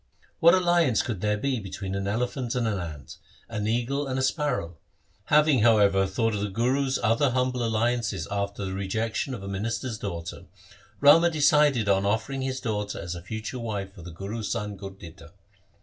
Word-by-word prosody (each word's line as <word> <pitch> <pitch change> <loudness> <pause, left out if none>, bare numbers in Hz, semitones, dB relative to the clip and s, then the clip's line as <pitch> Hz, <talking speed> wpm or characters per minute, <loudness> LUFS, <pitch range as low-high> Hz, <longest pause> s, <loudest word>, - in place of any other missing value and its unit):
What 170 +2 +7
alliance 175 - +3
could 105 -7 -4
there 105 0 +1
be 130 +2 -1
between 95 -1 -6
an 100 0 -2
elephant 120 +3 -2
and 120 -2 0
an 105 -3 -1
ant, 80 -5 -8 0.3
an 105 -2 -3
eagle 125 +5 -1
and 130 -1 -2
a 130 - 0
sparrow? 130 - -1 0.5
Having, 150 -3 +4
however, 100 -4 +4
thought 115 +2 0
of 105 - -2
the 105 - -1
Guru's 130 +6 +1
other 115 +6 +3
humble 125 0 0
alliances 115 -5 0
after 100 0 -2
the 95 - -4
rejection 110 +7 -2
of 100 - -9
a - - -6
minister's 110 +4 -3
daughter, 85 -5 -6 0.6
Rama 160 +4 +7
decided 150 -6 +3
on 100 0 +2
offering 115 +6 -1
his 130 0 -2
daughter 105 -3 -3
as 85 +1 -5
a 85 - -7
future 110 +6 -5
wife 100 -4 -4
for 100 - -12
the 85 - -9
Guru's 100 +5 -5
son 105 -3 -3
Gurditta. 90 -4 -11
110 Hz, 180 wpm, -26 LUFS, 100-130 Hz, 0.6 s, What